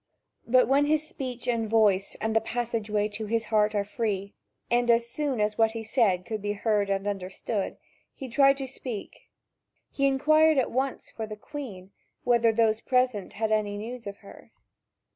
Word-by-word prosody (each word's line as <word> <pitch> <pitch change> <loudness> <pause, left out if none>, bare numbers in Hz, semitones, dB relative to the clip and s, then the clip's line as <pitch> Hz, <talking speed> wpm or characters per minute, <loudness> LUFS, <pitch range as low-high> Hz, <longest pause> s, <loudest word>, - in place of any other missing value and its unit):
But 255 +2 +5
when 280 +2 +4
his 310 0 +1
speech 255 -5 -6
and 230 -3 0
voice 205 -3 +2
and 220 0 -1
the 225 - +4
passageway 225 -3 -1
to 215 +1 -5
his 225 +1 0
heart 215 0 +3
are 200 -1 +1
free, 200 -2 -3 0.4
and 240 0 +2
as 235 0 +4
soon, 280 -1 -2
as 210 +1 0
what 225 0 +4
he 225 -1 -5
said 210 -6 +1
could 215 0 -4
be 205 0 -1
heard 210 -1 0
and 195 0 -1
understood, 195 +1 -3 0.4
he 265 - -7
tried 275 +3 +4
to 270 - -3
speak 250 -5 -8 0.6
he 275 0 +1
inquired 310 +3 +4
at 260 - +1
once 265 +2 -2
for 220 -1 -5
the 215 0 -7
Queen, 210 -8 -8 0.3
whether 235 -2 +4
those 220 0 +2
present 250 -6 0
had 220 +1 -1
any 210 -1 0
news 235 +2 -7
of 200 0 -6
her. - - -14
225 Hz, 180 wpm, -27 LUFS, 210-250 Hz, 0.6 s, But